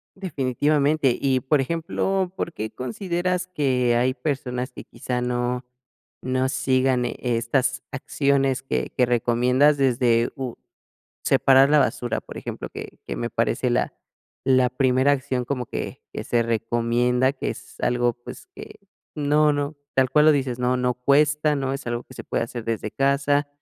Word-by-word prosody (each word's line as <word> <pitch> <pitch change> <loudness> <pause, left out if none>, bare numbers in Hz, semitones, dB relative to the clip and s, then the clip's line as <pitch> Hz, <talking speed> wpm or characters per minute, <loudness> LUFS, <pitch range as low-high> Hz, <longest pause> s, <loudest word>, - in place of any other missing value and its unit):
Definitivamente. 145 -4 +1
Y 135 -2 +2
por 140 +3 +1
ejemplo, 170 +5 -1
¿por 170 - -3
qué 110 +1 -4
consideras 175 - -2
que 130 -8 +1
hay 125 +2 +2
personas 130 -3 -3
que - - -10
quizá 125 -1 -4
no 125 0 -1 0.6
no 130 0 0
sigan 130 -1 +1
e 120 - -4
estas 125 +2 0
acciones 135 -1 0
que 65 - -2
que 125 - +5
recomiendas 125 +4 +3
desde 120 -3 +2
u 130 -3 -5 0.7
separar 135 0 +5
la 150 - +5
basura?, 120 -3 -1
por - - -10
ejemplo, - - -6
que - - -9
que - - -4
me - - -2
parece - - 0
la - - 0 0.5
la 130 -2 +4
primera 130 +1 +3
acción 130 -2 -1
como 125 -1 -3
que - - -6
que - - -4
se 120 -1 +1
recomienda, 120 +3 +1
que - - -3
es - - -10
algo, 120 -1 +1
pues, 120 - -11
que - - -10 0.4
No 150 +1 +3
no, 145 +1 -2 0.2
tal 130 -1 +3
cual 150 0 +4
lo 155 - +8
dices, 130 -4 -1
no 125 0 +1
no 125 0 0
cuesta, 150 +4 +2
no 135 -1 -2
es 135 - -7
algo 120 0 -3
que - - -15
se - - -8
puede - - -1
hacer 120 0 -7
desde 110 -1 -3
casa, 140 +2 +1
130 Hz, 165 wpm, -23 LUFS, 125-145 Hz, 0.7 s, lo